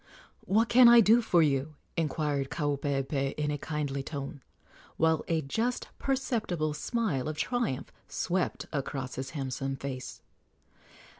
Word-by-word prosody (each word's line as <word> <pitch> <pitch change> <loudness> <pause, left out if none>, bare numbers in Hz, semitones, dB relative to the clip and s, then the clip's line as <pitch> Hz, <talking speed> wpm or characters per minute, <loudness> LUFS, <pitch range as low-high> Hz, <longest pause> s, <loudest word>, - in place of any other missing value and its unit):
"What 220 +3 +3
can 245 +1 +7
I 235 0 +9
do 230 +2 +6
for 175 -7 +4
you?" 145 +1 0 0.2
inquired 150 -4 -1
Kaupeepee 140 -2 -1
in 150 0 0
a 145 - -1
kindly 145 -3 -2
tone, 140 0 -6 0.6
while 160 -1 +3
a 165 -2 0
just 225 - -1
perceptible 220 - -1
smile 165 - -1
of 155 - -5
triumph 195 - -1
swept 180 0 -1
across 135 -2 -3
his 130 0 -4
handsome 135 -1 -3
face. 135 -1 -6
150 Hz, 130 wpm, -29 LUFS, 135-190 Hz, 0.6 s, I